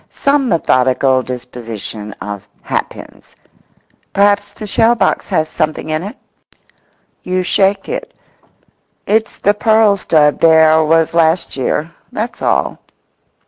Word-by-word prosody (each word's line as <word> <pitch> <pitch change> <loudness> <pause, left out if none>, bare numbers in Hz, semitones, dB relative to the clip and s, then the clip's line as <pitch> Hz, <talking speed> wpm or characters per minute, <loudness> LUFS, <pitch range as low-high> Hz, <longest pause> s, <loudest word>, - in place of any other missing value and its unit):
Some 280 -2 0
methodical 130 - +2
disposition 115 -4 -7
of 100 -1 -8 0.2
hat - - -2
pins. - - -14 0.8
Perhaps 200 0 +2
the 215 - -8
shell 225 +3 +2
box - - 0
has 160 -5 +1
something 155 0 -3
in 155 0 -1
it? 200 +4 -8 1.0
You 185 0 -2
shake 195 +2 +1
it; - - -6 0.9
it's 220 +1 0
the 205 - +2
pearl 215 -1 +3
stud 150 -5 +2
there 160 -1 +5
was 165 +1 +2
last 165 +1 +1
year—that's 170 - -4
all. - - 0
165 Hz, 115 wpm, -15 LUFS, 150-205 Hz, 1.0 s, there